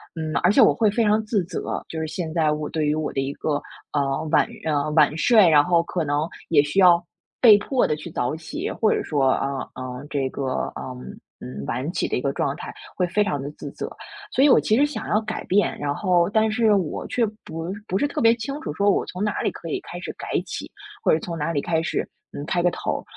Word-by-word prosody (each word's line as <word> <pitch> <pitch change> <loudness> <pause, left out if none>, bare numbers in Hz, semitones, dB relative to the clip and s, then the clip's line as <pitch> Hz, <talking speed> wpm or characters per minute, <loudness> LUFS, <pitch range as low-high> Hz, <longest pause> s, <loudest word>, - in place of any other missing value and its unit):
嗯， 155 -1 -4
而 180 - +5
且 265 - +5
我 - - +6
会 220 -2 +2
非 230 +2 +1
常 215 +1 +3
自 210 -4 0
责， 180 - -4
就 160 - -5
是 160 - -2
现 160 0 -4
在 155 -3 +2
我 150 0 -3
对 155 -2 -1
于 150 - +2
我 155 -1 -2
的 135 - -1
一 135 +1 -3
个， 145 -2 -1 0.4
嗯， 140 +2 -1
晚 - - +4 0.5
晚 150 -1 +5
睡， 215 0 +6
然 145 -2 +6
后 170 0 +3
可 175 -1 -2
能 145 +2 0 0.2
也 150 -4 +6
需 150 +7 -1
要 175 -2 +6 0.4
被 215 -5 +9
迫 250 +4 +1
地 150 - 0
去 155 +2 -9
早 125 +2 -1
起， 160 - -5
或 220 - +1
者 - - -1
说， 140 -3 0
啊， 135 -1 -1 0.2
呃， 130 +1 -6
这 135 -2 0
个， 140 - -5 0.3
呃， 130 -1 -6 0.4
嗯， 65 +2 -7
晚 130 +7 -2
起 - - -1
的 - - -1
一 125 - -1
个 140 - 0
状 140 +1 -1
态 - - -7 0.2
会 180 -1 +1
非 210 +4 +2
常 145 -9 -2
地 140 - -5
自 - - -8
责， - - -6 0.4
所 270 - +4
以 - - +6
我 - - +6
其 220 - +2
实 290 - +5
想 265 -7 -5
要 215 - +3
改 220 0 -5
变。 200 +2 +2
然 145 0 -1
后 180 -2 +2
但 220 +1 +2
是 220 -2 +3
我 185 -6 -1
却 240 -2 +1 0.2
不 165 +3 -5 0.2
不 190 - 0
是 290 - +1
特 - - -3
别 230 0 +5
清 275 +6 -5
楚 150 - -4
说， 200 +2 +3
我 - - +1
从 185 +3 -4
哪 210 - -1
里 - - +1
可 165 - -9
以 - - -1
开 175 - -8
始 - - -6
改 - - -8 0.2
起， - - -6 0.3
或 - - +4
者 155 - +3
从 170 -2 -5
哪 155 +2 -1
里 145 - 0
开 160 -1 0
始， 165 - -2 0.3
嗯， 145 - -6
开 175 0 0
个 175 - +3
头。 - - -3
170 Hz, 265 characters per minute, -23 LUFS, 150-210 Hz, 0.5 s, 被